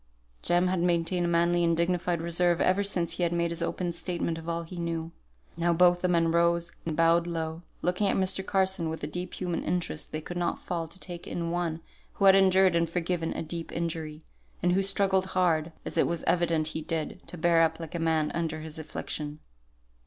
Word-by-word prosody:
Jem 175 Hz, +1 st, +2 dB
had 185 Hz, 0 st, +1 dB
maintained 175 Hz, 0 st, +1 dB
a -, -, 0 dB
manly 170 Hz, +1 st, +3 dB
and 170 Hz, -1 st, +2 dB
dignified 175 Hz, 0 st, 0 dB
reserve 170 Hz, 0 st, +2 dB
ever 185 Hz, +2 st, +3 dB
since 180 Hz, -4 st, -1 dB
he -, -, -3 dB
had 170 Hz, -1 st, +2 dB
made 170 Hz, -1 st, 0 dB
his 170 Hz, 0 st, -3 dB
open 175 Hz, +1 st, -1 dB
statement 170 Hz, -1 st, -2 dB
of 165 Hz, +1 st, -7 dB
all 170 Hz, 0 st, -2 dB
he 175 Hz, +2 st, -9 dB
knew. 165 Hz, -1 st, -3 dB, 0.4 s
Now 170 Hz, 0 st, +2 dB
both 175 Hz, +1 st, +4 dB
the 180 Hz, -, +2 dB
men 165 Hz, -2 st, +2 dB
rose 170 Hz, 0 st, +2 dB, 0.2 s
and 155 Hz, -, -2 dB
bowed 170 Hz, +1 st, +4 dB
low, 165 Hz, -1 st, -3 dB, 0.2 s
looking 180 Hz, +3 st, +1 dB
at -, -, +1 dB
Mr. 190 Hz, 0 st, +1 dB
Carson 190 Hz, -3 st, +1 dB
with 160 Hz, -, -5 dB
the -, -, -2 dB
deep 180 Hz, +4 st, -5 dB
human 175 Hz, -2 st, -2 dB
interest 170 Hz, -2 st, -2 dB
they 155 Hz, -, -2 dB
could 175 Hz, +3 st, -7 dB
not 175 Hz, -1 st, 0 dB
fail 170 Hz, -2 st, -4 dB
to 165 Hz, -, -15 dB
take 175 Hz, -2 st, -7 dB
in 170 Hz, -1 st, -3 dB
one 170 Hz, -2 st, -2 dB, 0.3 s
who 200 Hz, -, 0 dB
had 195 Hz, -, +9 dB
endured 190 Hz, -1 st, +5 dB
and 170 Hz, -1 st, +2 dB
forgiven 170 Hz, -1 st, -1 dB
a -, -, -4 dB
deep 165 Hz, +1 st, -5 dB
injury; 160 Hz, -2 st, -4 dB, 0.4 s
and 180 Hz, -, +3 dB
who 190 Hz, +2 st, +3 dB
struggled 195 Hz, -1 st, +2 dB
hard, 165 Hz, -3 st, +2 dB
as -, -, -5 dB
it -, -, +4 dB
was 170 Hz, -1 st, -2 dB
evident 165 Hz, -3 st, +2 dB
he 160 Hz, -, -4 dB
did, 165 Hz, +2 st, -3 dB
to 180 Hz, -, -7 dB
bear 170 Hz, 0 st, +4 dB
up 160 Hz, 0 st, +2 dB
like 165 Hz, -2 st, -7 dB
a 170 Hz, -, -2 dB
man 160 Hz, -2 st, +1 dB
under 160 Hz, -2 st, -2 dB
his 155 Hz, 0 st, -7 dB
affliction. 150 Hz, -1 st, -5 dB
170 Hz, 215 wpm, -28 LUFS, 165-180 Hz, 0.4 s, had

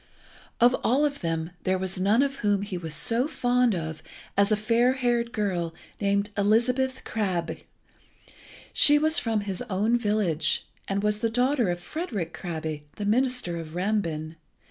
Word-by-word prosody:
Of 245 Hz, +1 st, +5 dB
all 270 Hz, +6 st, +3 dB
of 285 Hz, -1 st, -2 dB
them 165 Hz, -1 st, -2 dB
there 185 Hz, 0 st, +1 dB
was 185 Hz, 0 st, -3 dB
none 210 Hz, +7 st, +3 dB
of 275 Hz, 0 st, -2 dB
whom 205 Hz, -2 st, +1 dB
he 200 Hz, -2 st, -5 dB
was 165 Hz, -3 st, -4 dB
so 240 Hz, -, +2 dB
fond 245 Hz, -6 st, +1 dB
as 160 Hz, -2 st, -5 dB, 0.3 s
of 200 Hz, +1 st, +3 dB
a -, -, +5 dB
fair 230 Hz, +4 st, +2 dB
haired 240 Hz, -2 st, 0 dB
girl 180 Hz, -7 st, -2 dB, 0.2 s
named 200 Hz, 0 st, 0 dB
Elizabeth 250 Hz, +6 st, +1 dB
Krabbe. 180 Hz, -7 st, -3 dB, 1.1 s
She 295 Hz, 0 st, +7 dB
was 315 Hz, +2 st, +3 dB
from 225 Hz, -3 st, -1 dB
his 195 Hz, 0 st, -3 dB
own 215 Hz, +5 st, +1 dB
village, 195 Hz, -9 st, +1 dB, 0.2 s
and 200 Hz, +1 st, -1 dB
was 210 Hz, 0 st, +1 dB
the 230 Hz, -, 0 dB
daughter 245 Hz, -1 st, +1 dB
of 175 Hz, 0 st, -2 dB
Frederick 200 Hz, -, -4 dB
Krabbe, 160 Hz, -4 st, -5 dB
the 205 Hz, -, -4 dB
minister 245 Hz, -5 st, +1 dB
of 160 Hz, -1 st, -8 dB
Rambin. 170 Hz, -5 st, -2 dB
210 Hz, 160 wpm, -26 LUFS, 175-245 Hz, 1.1 s, She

